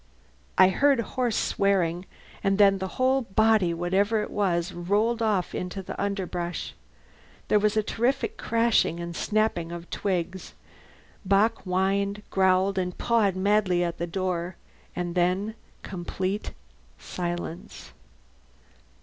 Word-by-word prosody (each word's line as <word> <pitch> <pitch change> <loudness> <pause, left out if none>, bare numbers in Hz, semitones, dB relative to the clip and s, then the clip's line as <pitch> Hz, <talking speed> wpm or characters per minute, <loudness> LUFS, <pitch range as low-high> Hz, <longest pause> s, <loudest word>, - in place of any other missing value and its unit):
I 185 0 +7
heard 275 +7 +3
hoarse 240 -1 -1
swearing, 185 -3 +1 0.4
and 195 0 +2
then 195 -2 +5
the 190 - -2
whole 260 +1 +3
body, 220 -4 +3
whatever 195 +6 +1
it - - -7
was, 180 -3 0
rolled 210 +7 0
off 210 -5 0
into 180 +2 -4
the - - -6
underbrush. 180 -3 -3 0.8
There 210 - +5
was 210 +1 +1
a 215 - +3
terrific 240 +6 0
crashing 230 -7 +1
and 170 0 -5
snapping 210 -6 0
of 170 0 -8
twigs. 185 -1 -3 0.7
Bock 200 +3 +2
whined, 200 +2 0
growled, 190 0 +3
and 180 -1 -3
pawed 220 -5 +2
madly 190 -2 +2
at 170 -1 -3
the 170 - -2
door. 180 -1 -2 0.4
And 175 -1 -3
then 185 +4 +1 0.3
complete 190 +2 -4 0.4
silence. 175 -1 -6
190 Hz, 125 wpm, -26 LUFS, 175-210 Hz, 0.8 s, I